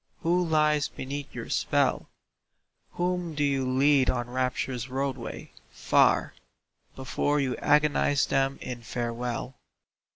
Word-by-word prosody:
Who 180 Hz, +1 st, +2 dB
lies 150 Hz, -3 st, +2 dB
beneath 140 Hz, +2 st, -7 dB
your -, -, -6 dB
spell? -, -, +1 dB, 0.8 s
Whom 175 Hz, -2 st, -2 dB
do 145 Hz, -, 0 dB
you 135 Hz, -2 st, +1 dB
lead 135 Hz, 0 st, +4 dB
on 120 Hz, -1 st, -2 dB
Rapture's 125 Hz, -1 st, -2 dB
roadway, 135 Hz, +1 st, -4 dB, 0.2 s
far, -, -, +2 dB, 0.6 s
Before 145 Hz, +2 st, -1 dB
you 130 Hz, -3 st, 0 dB
agonise 145 Hz, -1 st, +3 dB
them 135 Hz, 0 st, 0 dB
in 125 Hz, -1 st, -6 dB
farewell? 120 Hz, +2 st, -4 dB
135 Hz, 110 wpm, -27 LUFS, 125-150 Hz, 0.8 s, lead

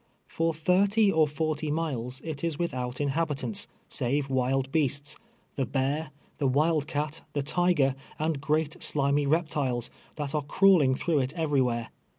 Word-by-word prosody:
For 165 Hz, 0 st, 0 dB
thirty 195 Hz, +6 st, +3 dB
or 160 Hz, -3 st, +4 dB
forty 155 Hz, 0 st, -2 dB
miles 130 Hz, -6 st, -2 dB
it 155 Hz, -2 st, -5 dB
is 165 Hz, -3 st, -1 dB
without 125 Hz, -7 st, -3 dB
inhabitants, 140 Hz, -5 st, -1 dB, 0.2 s
save 135 Hz, +3 st, -1 dB
wild 130 Hz, +1 st, +1 dB
beasts 145 Hz, -1 st, 0 dB, 0.2 s
— -, -, -39 dB
the 135 Hz, -, +1 dB
bear, 140 Hz, +4 st, -1 dB, 0.3 s
the 140 Hz, -, +2 dB
wild 150 Hz, +2 st, +2 dB
cat, 150 Hz, 0 st, -2 dB
the 145 Hz, -, -1 dB
tiger, 155 Hz, -3 st, +2 dB, 0.2 s
and 155 Hz, -2 st, -1 dB
great 155 Hz, +2 st, 0 dB
slimy 140 Hz, 0 st, +2 dB
rej^tiles, 140 Hz, -6 st, 0 dB, 0.2 s
that 145 Hz, -3 st, -4 dB
are 150 Hz, -, +1 dB
crawling 150 Hz, -3 st, +4 dB
through 160 Hz, +1 st, +1 dB
it 130 Hz, 0 st, -1 dB
everywhere. 130 Hz, -7 st, +1 dB
145 Hz, 150 wpm, -28 LUFS, 135-160 Hz, 0.3 s, or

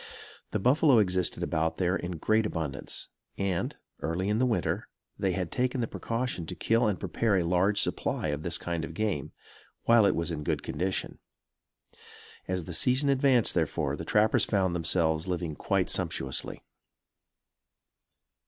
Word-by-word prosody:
The -, -, -1 dB
buffalo 130 Hz, +5 st, +4 dB
existed 95 Hz, -3 st, +2 dB
about 80 Hz, +1 st, -1 dB
there 90 Hz, 0 st, +1 dB
in 90 Hz, -1 st, -4 dB
great 110 Hz, +6 st, +2 dB
abundance; 75 Hz, -6 st, -3 dB, 0.3 s
and, 95 Hz, -3 st, -1 dB, 0.2 s
early 90 Hz, +4 st, -2 dB
in 105 Hz, +1 st, +1 dB
the 130 Hz, -, +3 dB
winter, 115 Hz, -, -1 dB, 0.3 s
they 95 Hz, -2 st, +1 dB
had 90 Hz, -3 st, -3 dB
taken 130 Hz, +1 st, 0 dB
the 120 Hz, -, +1 dB
precaution 115 Hz, -9 st, -3 dB
to -, -, -5 dB
kill 115 Hz, +1 st, +2 dB
and 100 Hz, -3 st, -1 dB
prepare 110 Hz, -4 st, 0 dB
a 90 Hz, -, +1 dB
large 90 Hz, +4 st, +2 dB
supply 80 Hz, -, 0 dB
of 75 Hz, 0 st, -2 dB
this 85 Hz, +1 st, -1 dB
kind 85 Hz, -2 st, -3 dB
of 80 Hz, 0 st, -6 dB
game, 90 Hz, -9 st, -2 dB, 0.5 s
while 115 Hz, -3 st, +5 dB
it -, -, +2 dB
was 85 Hz, +1 st, -1 dB
in 75 Hz, -2 st, -4 dB
good -, -, -1 dB
condition. 90 Hz, +4 st, -3 dB, 1.3 s
As 90 Hz, -1 st, -2 dB
the 90 Hz, -, -7 dB
season 130 Hz, -, +3 dB
advanced 135 Hz, -3 st, +4 dB
therefore, 80 Hz, -4 st, 0 dB
the -, -, -6 dB
trappers 105 Hz, +1 st, +3 dB
found 95 Hz, -4 st, +1 dB
themselves 80 Hz, -1 st, +1 dB
living 85 Hz, -4 st, -2 dB
quite -, -, 0 dB
sumptuously. 65 Hz, 0 st, -1 dB
95 Hz, 155 wpm, -29 LUFS, 85-110 Hz, 1.3 s, while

